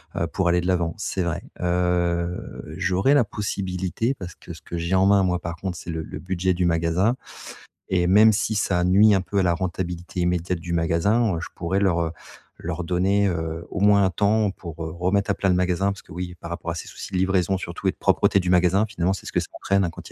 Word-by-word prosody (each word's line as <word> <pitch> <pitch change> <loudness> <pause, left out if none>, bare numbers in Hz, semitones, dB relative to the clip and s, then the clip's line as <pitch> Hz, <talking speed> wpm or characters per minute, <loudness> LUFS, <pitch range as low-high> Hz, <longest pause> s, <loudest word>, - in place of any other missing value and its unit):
heu, - - 0
pour 90 -2 0
aller 90 +1 +3
de 90 - -3
l'avant, 85 -3 +1
c'est 95 -2 -2
vrai. 85 -3 -2 0.2
Heu 90 -5 -1 0.2
j'aurais 95 +8 +2
la 140 - +5
possibilité, 100 +2 -2
parce 90 -9 -9
que - - -10
ce - - -13
que 85 - -6
j'ai 85 +2 -2
en 95 +1 +4
main, 100 -1 +5
moi, 90 -1 +1
par 85 0 -4
contre, 90 0 -5
c'est - - -9
le 80 -1 -3
le - - -8
budget 95 0 0
du 90 0 0
magasin 85 +7 +1 0.8
et 90 -1 +3
même 105 +4 +7
si 110 +1 0
ça 95 -4 +1
nuit 105 +4 +6
un 95 - +3
peu 100 +2 -2
à 95 - +3
la 85 - +3
rentabilité 90 -1 -4
immédiate 90 0 0
du 85 +1 -7
magasin, 85 +5 +2
je - - -5
pourrais 90 +3 -1
leur, 90 -4 +2
heu, 80 -1 -1 0.5
leur 85 +1 -4
donner, 95 +3 +2
heu, 80 -2 -3
au 100 - -4
moins 100 -1 +5
un - - +2
temps 105 +1 +2
pour, 85 -3 -9
heu, 80 - -5
remettre 95 +4 0
à 100 - +3
plat 95 - 0
le 90 - +3
magasin 90 +2 +1
parce 100 - -8
que, - - -14
oui, 90 +1 -5
par 85 - -8
rapport 85 0 -4
à - - -4
ces 80 - -6
soucis - - -9
de 95 - -1
livraison 95 0 +1
surtout 85 -2 -3
et - - +2
de - - -22
propreté 100 - +3
du 90 -1 -2
magasin, 90 +3 +4
finalement, 95 -3 -1
c'est 95 - -8
ce - - -7
que - - +2
ça - - -6
entraîne, 100 0 +2
hein, 85 - 0
quand - - -11
il - - -13
90 Hz, 250 wpm, -24 LUFS, 85-100 Hz, 0.8 s, même